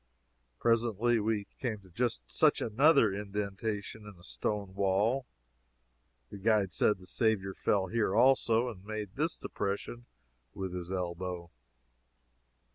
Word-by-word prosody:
Presently 115 0 +2
we 105 -1 0
came 110 -5 -3
to 95 -2 -19
just 110 - -1
such - - +3
another 130 0 +4
indention 105 +1 -4
in - - -17
a - - -17
stone 95 - -3
wall. 100 +7 +1 1.0
The 100 - -8
guide 105 -3 +2
said 105 - +2
the 90 - -15
Saviour 100 -2 0
fell 100 0 +1
here, 105 -2 0
also, 125 -2 +4
and 100 -6 -7
made 105 -2 -5
this 155 +3 -1
depression 105 +4 -4 0.5
with 95 -2 -4
his 90 0 -5
elbow. 90 -1 -4
105 Hz, 125 wpm, -31 LUFS, 95-115 Hz, 1.0 s, another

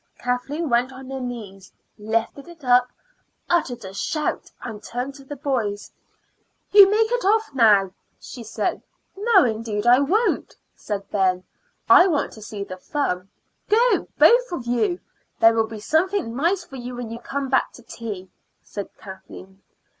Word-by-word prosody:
Kathleen 270 +6 -2
went 245 +1 +1
on 265 0 -10
her 270 - -4
knees, 215 -7 -7 0.3
lifted 225 +7 -2
it 340 -3 -14
up, 250 0 +5 0.6
uttered 250 - 0
a 190 - -8
shout, 300 +9 -2
and 220 -3 -7
turned 250 +3 -5
to 275 0 -13
the 290 +2 -8
boys. 240 -8 -2 0.8
"You 400 -1 +9
make 440 +2 +2
off 435 -1 +2
now," 210 -7 +4 0.3
she 240 - -9
said. 215 - -2 0.3
"No, 405 - +4
indeed 220 -2 -2
I 245 +2 +6
won't," 405 +12 0 0.2
said 200 -2 -5
Ben. 185 -2 +1 0.4
"I 360 - +8
want 310 -6 0
to 215 - -13
see 205 -1 -6
the 185 -2 -8
fun." 185 -5 -3 0.4
"Go, 470 +3 +3
both - - +5
of 265 -9 -4
you. 295 - 0 0.4
There 225 0 +6
will 225 -1 +1
be 220 -1 -8
something 320 - 0
nice 345 +7 +1
for 305 -7 -11
you 245 0 -7
when 240 -2 -6
you 230 - -6
come 275 +2 -4
back 265 0 +1
to 245 - -14
tea," 205 -6 -7 0.3
said 200 -2 -7
Kathleen. 190 0 -12
245 Hz, 160 wpm, -23 LUFS, 215-310 Hz, 0.8 s, You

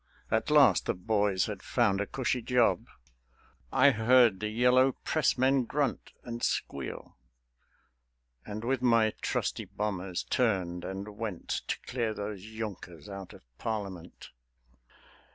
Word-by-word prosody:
At - - +1
last - - +5
the - - 0
boys 100 0 +1
had 100 -3 -6
found 105 -5 +1
a 100 - -2
cushy 130 -1 -1
job. 125 0 +2 0.8
I 140 +1 +6
heard 115 -3 +4
the 105 - -2
Yellow 125 +4 +4
Pressmen 135 -3 +1
grunt 140 +1 -2
and 120 0 -6
squeal; - - -3 1.3
And 105 +1 -6
with 130 +1 0
my 115 -3 +3
trusty - - -2
bombers 95 -3 -3
turned 90 -8 0
and 95 +2 -5
went 105 -6 -5 0.2
To - - -1
clear 115 -3 -2
those 100 -2 -5
Junkers 105 -7 -7
out 100 -2 -8
of - - -15 0.2
Parliament. 100 -6 -5
110 Hz, 125 wpm, -30 LUFS, 95-125 Hz, 1.3 s, I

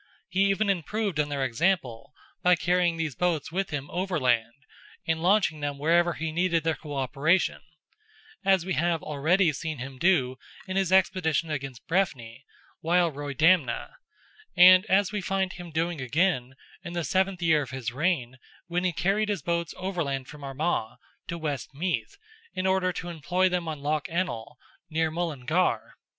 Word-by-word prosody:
He 195 +1 +2
even 205 +2 +1
improved 195 0 -1
on 150 -1 +1
their 140 -2 -1
example, 130 -2 -1 0.3
by 180 0 +5
carrying 175 0 +1
these 160 -3 -2
boats 170 0 -1
with 190 +2 -1
him 145 -2 -4
overland, 130 -9 0 0.4
and 160 0 0
launching 180 -4 +2
them 145 -1 -3
wherever 170 +4 +3
he 160 +2 -4
needed 170 -1 +1
their 160 0 +1
co 150 -2 -8
operation; 140 +7 +1 0.8
as 190 -3 +3
we 190 - -1
have 170 -1 0
already 155 +4 +2
seen 155 +2 -4
him 130 +1 -8
do 135 -8 +2 0.3
in 185 - -4
his 190 -2 +1
expedition 170 -4 +2
against 135 -5 -5
Breffni, 135 -9 -1 0.3
while 170 +1 +2
Roydamna, 145 0 +1 0.7
and 185 +2 +8
as 195 +1 +3
we 210 -1 -2
find 190 0 -1
him 175 -1 -9
doing 165 -1 -2
again, 130 -2 0 0.3
in 175 -2 -7
the 170 -1 -2
seventh 190 +1 0
year 160 -3 +4
of 135 - -6
his 130 -2 -4
reign, 130 -3 -1 0.3
when 175 0 -2
he 185 - +2
carried 195 +6 +1
his 205 - -2
boats 170 -2 -1
overland 160 -8 -3
from 150 -1 -11
Armagh 135 -4 -2 0.3
to 170 - -4
West 145 -4 -4
Meath 150 -8 -2 0.4
in 185 - -2
order 190 -1 +2
to 175 0 -6
employ 175 +3 +1
them 180 -2 -2
on 155 -3 -5
Loch 150 0 0
Ennell, 160 -10 -3 0.3
near 160 0 0
Mullingar. 165 0 -1
165 Hz, 165 wpm, -27 LUFS, 140-185 Hz, 0.8 s, and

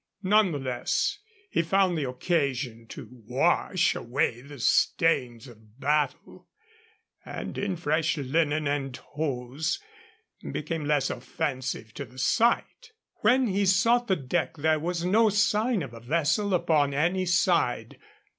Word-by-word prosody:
None 205 0 +4
the 145 - -2
less, 130 - -1 0.3
he - - +2
found 185 +1 +2
the 145 -5 -2
occasion 130 -5 -2
to 110 - -9
wash 140 - +1
away 120 0 -1
the 140 +2 -11
stains 125 -2 +1
of 110 0 -18
battle, 150 +5 -1 0.8
and - - -6
in 200 -2 -2
fresh 160 -1 0
linen 150 +2 0
and 135 -3 -2
hose 145 - -3 0.7
became 155 0 -3
less 145 -2 +1
offensive 130 -3 -4
to 140 - -6
the 125 +2 -18
sight. 240 - +1 0.2
When 255 +1 +3
he 200 -2 0
sought 230 +6 +3
the 190 - +2
deck 160 +3 -2
there 155 +1 +2
was 170 +2 -2
no 220 +4 +4
sign 210 0 +1
of 125 -4 -8
a 115 - -9
vessel 165 - +1
upon 150 -5 +2
any 180 +5 +1
side. 170 - +1
155 Hz, 135 wpm, -27 LUFS, 130-180 Hz, 0.8 s, None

